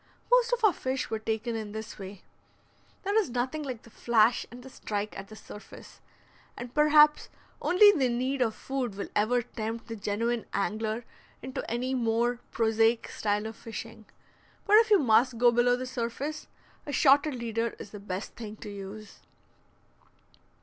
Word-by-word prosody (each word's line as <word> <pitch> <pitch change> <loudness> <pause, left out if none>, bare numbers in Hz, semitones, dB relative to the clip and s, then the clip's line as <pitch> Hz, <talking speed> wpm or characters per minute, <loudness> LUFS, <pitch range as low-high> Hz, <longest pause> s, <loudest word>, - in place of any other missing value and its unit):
Most - - +4
of - - 0
our 420 -4 +6
fish 260 -2 -3
were 220 - -1
taken 220 +2 -2
in 215 -2 -5
this 220 0 -7
way. 195 0 -9 0.8
There 400 +1 -1
is 415 - -1
nothing 255 +5 -2
like 255 -6 -6
the 230 - -16
flash 235 +1 +2
and 245 +1 -11
the 265 - -10
strike 210 -2 -4
at 195 - -7
the 215 - -12
surface, 210 -1 -12 0.6
and 245 0 -7
perhaps 300 0 +5 0.3
only 410 +4 +7
the 275 -10 +1
need 255 +3 -1
of 225 -3 +1
food 260 -6 -3
will 200 - -5
ever 240 +4 +2
tempt 225 0 -5
the 225 - -4
genuine 225 +3 -2
angler 215 +3 -2 0.4
into 260 +1 -5
any 250 +3 -2
more 235 0 +1
prosaic 225 0 +2
style 210 0 -1
of 220 0 -6
fishing; 225 0 -9 0.6
but 415 +1 +6
if 450 0 +5
you 415 - +7
must 245 - +3
go 240 +1 +5
below 240 +1 +3
the 255 +1 -5
surface, 255 +5 -4 0.4
a - - -3
shotted 285 +1 +4
leader 230 -1 -2
is 200 - -10
the 210 - -8
best 195 0 -6
thing 215 -2 -7
to 210 - -9
use. 200 +1 -9
235 Hz, 170 wpm, -28 LUFS, 220-260 Hz, 0.8 s, only